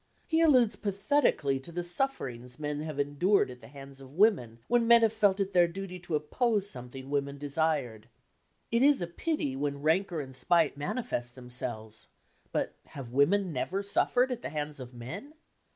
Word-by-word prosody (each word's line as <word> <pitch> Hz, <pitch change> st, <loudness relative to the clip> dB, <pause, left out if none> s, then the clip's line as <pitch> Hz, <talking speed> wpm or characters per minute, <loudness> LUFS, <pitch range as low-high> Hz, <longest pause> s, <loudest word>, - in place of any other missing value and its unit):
He 325 Hz, -1 st, +1 dB
alludes 250 Hz, -9 st, +5 dB
pathetically 200 Hz, -, +1 dB
to 150 Hz, +6 st, -11 dB
the 175 Hz, +1 st, -3 dB
sufferings 135 Hz, -, -2 dB
men 150 Hz, -1 st, -3 dB
have 155 Hz, -2 st, -5 dB
endured 145 Hz, +4 st, +2 dB
at 125 Hz, 0 st, -12 dB
the -, -, -12 dB
hands 135 Hz, 0 st, -12 dB
of 135 Hz, +2 st, -13 dB
women 170 Hz, -, +3 dB
when 240 Hz, -1 st, +2 dB
men 235 Hz, 0 st, +7 dB
have 220 Hz, -1 st, +3 dB
felt 205 Hz, -3 st, +2 dB
it 195 Hz, 0 st, -1 dB
their 175 Hz, -1 st, +5 dB
duty 180 Hz, +1 st, -7 dB
to 175 Hz, -2 st, -3 dB
oppose 205 Hz, -, 0 dB
something 130 Hz, -2 st, -6 dB
women 140 Hz, 0 st, -1 dB
desired. 140 Hz, -6 st, -1 dB, 0.6 s
It 235 Hz, +1 st, +2 dB
is 280 Hz, -7 st, +4 dB
a -, -, 0 dB
pity 170 Hz, -, -2 dB
when 140 Hz, +1 st, -3 dB
rancour 170 Hz, +2 st, +1 dB
and 130 Hz, -3 st, -7 dB
spite 165 Hz, +2 st, +3 dB
manifest 145 Hz, -, -3 dB
themselves, 120 Hz, -3 st, -5 dB, 0.4 s
but -, -, -1 dB
have 130 Hz, -4 st, -9 dB
women 175 Hz, +7 st, +2 dB
never 190 Hz, +9 st, -2 dB
suffered 245 Hz, +5 st, +2 dB
at 245 Hz, -1 st, -3 dB
the -, -, -5 dB
hands 150 Hz, -1 st, -4 dB
of 125 Hz, -1 st, -8 dB
men? 165 Hz, -, -8 dB
155 Hz, 175 wpm, -29 LUFS, 135-200 Hz, 0.6 s, men